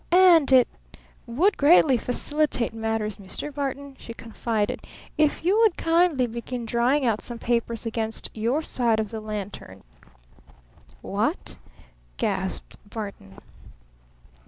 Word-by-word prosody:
"And 345 -6 +6
it 255 -2 +7 0.6
would 335 - +2
greatly 290 -2 +6
facilitate 250 +1 -1
matters, 220 -1 -2
Mr. 205 +9 -7
Barton," 280 0 -4
she 230 - -9
confided, 225 -2 -2 0.3
"if 305 +1 +1
you 395 +5 +4
would 445 -6 +4
kindly 330 -5 +3
begin 235 +1 -5
drying 245 +5 +2
out 220 -3 +1
some 240 - -6
papers 235 -1 -1
against 225 -1 -2
your 235 +8 0
side 235 -6 +1
of 215 -2 -2
the 220 -1 -5
lantern." 205 - -7 1.2
"What?" - - -2 0.6
gasped - - -2
Barton. 200 - -7
235 Hz, 115 wpm, -25 LUFS, 220-290 Hz, 1.2 s, it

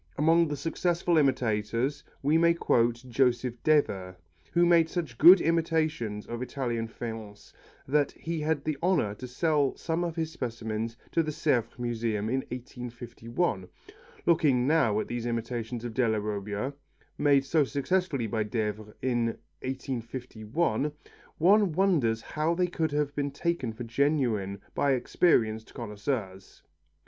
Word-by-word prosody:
Among 165 +3 +4
the 145 -1 -3
successful 170 +3 0
imitators 120 -1 0 0.2
we 145 +3 +3
may 170 +1 +4
quote 120 -5 +1
Joseph 125 -1 +1
Devers, 100 -12 +1 0.4
who 175 0 +4
made 170 -2 +5
such 160 -11 -4
good 180 +5 +10
imitations 160 -10 0
of 120 +1 -5
Italian 120 -3 -2
faience 110 -3 -8 0.3
that 145 +1 +2
he 165 0 -4
had 155 -2 0
the 155 -3 -2
honour 165 - +2
to 125 +4 -8
sell 145 +2 +1
some 165 +1 -1
of 170 -2 -3
his 160 -1 -2
specimens 115 -4 -4
to 165 - +3
the 155 - -3
Sèvres 130 -7 0
Museum 115 -3 -2
in 130 +2 +1
1851. 120 - -4 0.6
Looking 145 -7 +3
now 135 -8 +3
at - - -3
these 120 0 -3
imitations 115 0 -3
of 120 - -5
Della 110 -3 +2
Robbia, 105 +4 -3 0.5
made 140 -2 +4
so 155 +2 +3
successfully 140 -1 0
by 110 0 -1
Devers 105 -1 -3
in 120 -2 +1 0.4
1851, 130 +1 -2 0.4
one 195 +3 +5
wonders 150 - +2
how 155 +2 -1
they 180 +1 +2
could 165 -3 -1
have 145 -1 0
been 145 -1 -1
taken 140 -3 -2
for 110 +2 -7
genuine 115 -6 0
by 140 -1 +2
experienced 115 -4 +1
connoisseurs. 105 -3 -5
130 Hz, 135 wpm, -28 LUFS, 115-155 Hz, 0.6 s, good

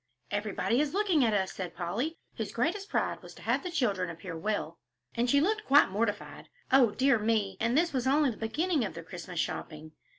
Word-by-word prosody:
"Everybody 215 +4 0
is 300 +3 -1
looking 385 -8 +3
at 220 -3 +2
us," 190 -1 0
said 180 -3 -6
Polly, 210 - -2 0.2
whose 220 -4 -4
greatest 375 - -1
pride - - -1
was - - -12
to - - -13
have - - +1
the 365 - -4
children 205 - 0
appear 170 +1 -7
well, 170 -2 -3 0.3
and 240 +1 0
she 280 - +5
looked 425 +7 0
quite 280 -7 +6
mortified. 205 +1 -3 0.2
"O 260 -3 +6
dear 260 +2 +2
me!" 210 -3 0
and 230 +4 +1
this 340 0 +2
was 260 -1 0
only 285 0 +3
the 215 - -9
beginning 295 +7 0
of 200 - -4
the 165 - -7
Christmas 175 +1 -7
shopping! 155 -1 -4
230 Hz, 205 wpm, -30 LUFS, 195-290 Hz, 0.3 s, quite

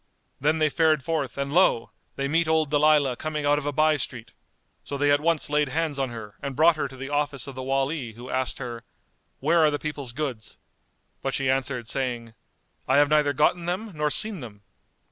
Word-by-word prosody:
[FN#206] - - -41
Then 155 +3 +2
they 155 -1 +2
fared 155 -2 +2
forth 145 -5 -2
and 140 +1 -3
lo! 170 -9 +3 0.2
they 140 - -2
met 165 +3 +1
old 160 -2 +1
Dalilah 145 -3 +4
coming 155 -1 -3
out 145 0 +3
of 145 - -6
a - - +1
by 155 +1 +3
street: 120 -4 -6 0.5
so 140 - -5
they 145 +1 +2
at 145 0 +3
once 165 -1 +1
laid 150 -1 +1
hands 155 0 -1
on 135 -2 0
her 110 -3 -9
and 140 -1 -4
brought 160 +3 +5
her 155 - -2
to 130 - -12
the 135 +1 -6
office 145 -3 -1
of 140 - -8
the 130 - -6
Wali 135 -1 -1
who 120 +3 -11
asked 130 0 -2
her, 120 -3 -6 0.6
"Where 165 +5 +3
are 155 -1 +5
the 145 - -1
people's 145 -5 -5
goods?" 130 -6 -5 0.6
But 135 - -2
she 135 -1 +1
answered, 130 -3 -2
saying, 120 -3 -2 0.5
"I - - +3
have 145 0 +5
neither 150 -1 +3
gotten 155 +4 +1
them 195 +5 -3
nor 150 -1 0
seen 215 +5 +2
them." 105 -6 -11
145 Hz, 215 wpm, -25 LUFS, 130-155 Hz, 0.6 s, brought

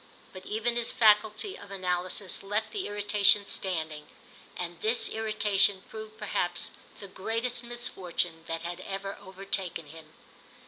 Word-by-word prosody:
But 185 0 -9
even 225 +3 0
his 235 - +3
faculty 220 - +4
of 205 - -11
analysis 185 0 -1
left 205 +3 -1
the 400 - -2
irritation 205 0 +4
standing, 160 -7 -2 0.5
and 175 -1 -5
this 225 +3 +4
irritation 210 -3 +2
proved 220 0 -8
perhaps 180 -5 0 0.3
the 200 - -8
greatest 230 +6 -2
misfortune 180 -8 -2
that 165 0 -3
had 175 +1 -4
ever 195 +1 -4
overtaken 190 -3 -3
him. 155 +1 -12
200 Hz, 130 wpm, -30 LUFS, 180-220 Hz, 0.5 s, faculty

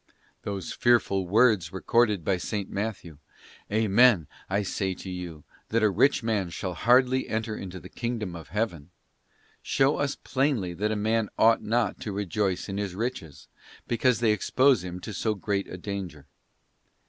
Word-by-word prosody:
Those 100 -2 -4
fearful 100 -6 +2
words 105 -4 +3
recorded 105 -1 +1
by 100 - +2
S. 90 - -4 0.2
Matthew, 100 -7 -5 0.5
'Amen, 110 -3 +4 0.2
I 100 +2 +1
say 95 -1 -2
to 95 - -8
you, 85 -4 -7 0.3
that 115 0 +1
a 105 - +4
rich 135 +7 +3
man 105 -5 0
shall 90 +2 -4
hardly 125 +7 +3
enter 110 0 -2
into 95 -2 -7
the - - -11
kingdom 115 -7 -4
of 80 -4 -9
Heaven,'{ 90 -5 -3 0.7
show 135 +2 +2
us 145 -1 -1
plainly 130 -10 -1
that 105 +5 -1
a - - 0
man 110 +1 0
ought 115 0 +5
not 115 -2 0
to 105 - -5
rejoice 100 -1 -1
in 100 0 -4
his 100 -3 -3
riches, 105 - -5 0.4
because 120 0 +2
they 115 -2 +4
expose 130 +1 +3
him 90 0 -6
to 110 - -6
so 110 +2 -1
greata 100 -1 -3
danger. 90 -7 -6
105 Hz, 160 wpm, -27 LUFS, 95-115 Hz, 0.7 s, ought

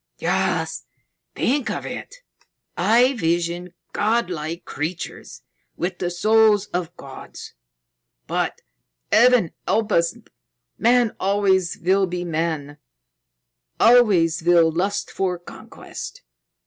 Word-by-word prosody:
"Yes. - - -1 0.5
Think 275 +1 0
of - - -4
it! - - -7 0.6
I 235 +8 +4
visioned 175 -3 -1 0.2
godlike 180 -7 -1
creatures 160 +3 -6 0.3
with 180 +1 -3
the 175 - -1
souls 215 +3 +3
of 175 -1 -3
gods. 135 -1 -10 0.7
But, - - -2 0.5
Heaven 240 -7 +5 0.2
help 220 -1 +1
us, 170 +6 +2 0.6
man 240 -1 +3
always 190 -2 +1
will 190 +3 +2
be 175 0 -4
man: 160 -3 -3 1.0
always 195 -10 +5
will 170 -1 +4
lust 190 +5 -2
for 185 -2 -1
conquest. 175 - -10
180 Hz, 95 wpm, -22 LUFS, 170-215 Hz, 1.0 s, Heaven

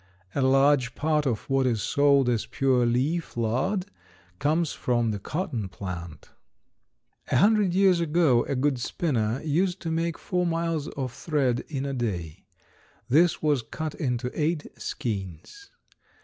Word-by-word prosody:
A 140 - 0
large 135 -1 +3
part 150 -1 +1
of 115 -5 -2
what 135 -1 +2
is 115 -5 0
sold 140 -2 +3
as 120 -3 0
pure 130 -3 +2
leaf 135 +6 -1
lard 130 - 0 0.5
comes 155 +2 +1
from 120 -2 0
the 105 - -4
cotton 130 - -3
plant. 85 -5 -8 1.0
A - - +2
hundred 200 - +4
years 190 -2 +4
ago 155 -7 +3
a 140 - -2
good 135 0 +1
spinner 120 -4 -1
used 175 +5 0
to 165 - -3
make 165 0 -1
four 180 -1 -1
miles 165 -2 -1
of 130 -5 -4
thread 135 -5 0
in 140 -3 -3
a 140 - -3
day. 90 - -4 0.6
This 160 +6 +3
was 145 -4 +2
cut 155 +6 -5
into 125 -4 -2
eight 155 0 -1
skeins. 105 - -6
140 Hz, 145 wpm, -26 LUFS, 120-165 Hz, 1.0 s, hundred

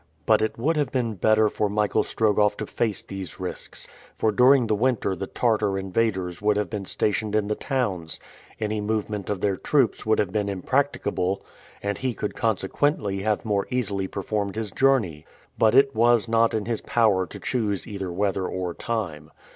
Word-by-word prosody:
But - - +4
it 110 - -1
would 155 +7 +1
have 145 -3 0
been 120 -4 0
better 110 +2 +3
for 105 0 -1
Michael 105 0 +1
Strogoff 105 -1 +2
to 110 - -3
face 110 -1 -1
these 95 -4 -7
risks; - - -5 0.3
for 110 - +2
during 125 +4 +5
the 110 - +1
winter 110 -3 +1
the 95 +2 -5
Tartar 105 -4 +1
invaders 95 -2 -1
would 105 0 +2
have 105 - -1
been 105 -3 -4
stationed 105 +2 -1
in 105 -1 +1
the - - +2
towns, 105 - -2 0.4
any 105 -1 -1
movement 105 -1 -2
of 100 -2 -2
their 100 -2 +1
troops 135 +2 +1
would 110 0 +2
have 100 -3 0
been 105 0 0
impracticable, 100 -3 -1 0.4
and 100 0 -2
he 130 -3 -2
could 105 - -3
consequently 105 - 0
have 105 +1 0
more 100 -2 0
easily 105 -6 -1
performed 100 +1 -3
his 110 -2 -3
journey. 110 - +2 0.4
But 110 +1 +4
it 135 0 +5
was 120 0 +4
not 115 0 +3
in 105 -2 -1
his 115 -2 -2
power 105 -6 +2
to - - -10
choose 105 -7 -1
either 100 -5 -5
weather 95 0 0
or 90 -2 -3
time. 85 -11 -4
105 Hz, 180 wpm, -25 LUFS, 95-115 Hz, 0.4 s, during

